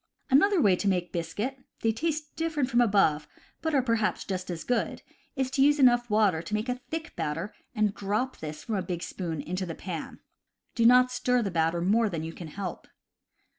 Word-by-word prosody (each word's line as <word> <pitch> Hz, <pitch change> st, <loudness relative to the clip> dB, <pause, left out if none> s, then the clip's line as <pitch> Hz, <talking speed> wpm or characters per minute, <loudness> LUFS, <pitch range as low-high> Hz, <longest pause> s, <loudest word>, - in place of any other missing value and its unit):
Another 380 Hz, +8 st, +5 dB
way 200 Hz, -, +5 dB
to 200 Hz, -, -2 dB
make 180 Hz, -2 st, 0 dB
biscuit 205 Hz, +11 st, -3 dB, 0.2 s
(they 225 Hz, -, +3 dB
taste 305 Hz, +4 st, -3 dB
different 315 Hz, -5 st, -1 dB
from 240 Hz, -, +3 dB
the 240 Hz, -, +6 dB
above, 180 Hz, -8 st, +2 dB, 0.3 s
but 320 Hz, -2 st, 0 dB
are 265 Hz, -, +3 dB
perhaps 230 Hz, -3 st, 0 dB
just 185 Hz, -1 st, -4 dB
as 170 Hz, -2 st, -4 dB
good) 245 Hz, -2 st, -1 dB, 0.3 s
is 265 Hz, -2 st, -1 dB
to 270 Hz, -, +1 dB
use 290 Hz, +2 st, +5 dB
enough 240 Hz, -3 st, +4 dB
water 210 Hz, -6 st, +3 dB
to 170 Hz, +5 st, -8 dB
make 215 Hz, +3 st, -2 dB
a 250 Hz, 0 st, -3 dB
thick 325 Hz, +1 st, -5 dB
batter, 165 Hz, +7 st, -3 dB, 0.2 s
and 210 Hz, -2 st, +2 dB
drop 210 Hz, +7 st, -2 dB
this 150 Hz, -1 st, -7 dB
from 220 Hz, -3 st, -2 dB
a -, -, 0 dB
big 180 Hz, -1 st, -4 dB
spoon 165 Hz, -5 st, -4 dB
into 180 Hz, +2 st, -3 dB
the 165 Hz, -, -5 dB
pan. 170 Hz, -5 st, -6 dB, 0.5 s
Do 230 Hz, -1 st, +4 dB
not 250 Hz, +1 st, +6 dB
stir 250 Hz, -1 st, +1 dB
the 195 Hz, -, -2 dB
batter 165 Hz, 0 st, +1 dB
more 215 Hz, +5 st, +3 dB
than 165 Hz, -4 st, -4 dB
you 165 Hz, +1 st, -5 dB
can 170 Hz, -, -8 dB
help. 185 Hz, +2 st, -6 dB
215 Hz, 210 wpm, -28 LUFS, 175-255 Hz, 0.5 s, the